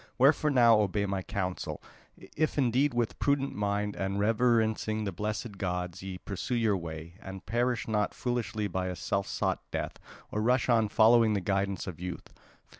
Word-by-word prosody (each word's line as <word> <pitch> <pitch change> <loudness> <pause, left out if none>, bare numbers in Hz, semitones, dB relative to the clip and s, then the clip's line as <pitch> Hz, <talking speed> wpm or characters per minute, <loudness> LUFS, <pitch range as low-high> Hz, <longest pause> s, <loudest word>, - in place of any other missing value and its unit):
Wherefore 145 +3 +4
now 120 -5 +6
obey 100 0 +1
my 95 -1 -2
counsel, 95 -2 -3 0.6
if 155 0 0
indeed 135 +2 +3
with 120 -2 -1
prudent 140 -1 +1
mind 105 0 -1
and 95 +1 -2
reverencing 110 0 +2
the 100 - -2
blessed 105 +2 -4
gods 90 -2 -3
ye 95 -1 -6
pursue 100 +7 -4
your 110 -3 +2
way; 85 +1 -7
and 95 -2 -9
perish 120 +1 0
not 105 -2 0
foolishly 115 -4 -2
by 95 0 -2
a 90 - -3
self 100 +3 -2
sought - - -1
death, - - -4 0.3
or 105 - -1
rush 125 +3 +2
on 115 -3 +3
following 110 0 +5
the 100 - +1
guidance 100 0 -1
of 90 -4 -7
youth. 90 -1 -7
105 Hz, 170 wpm, -29 LUFS, 95-120 Hz, 0.6 s, now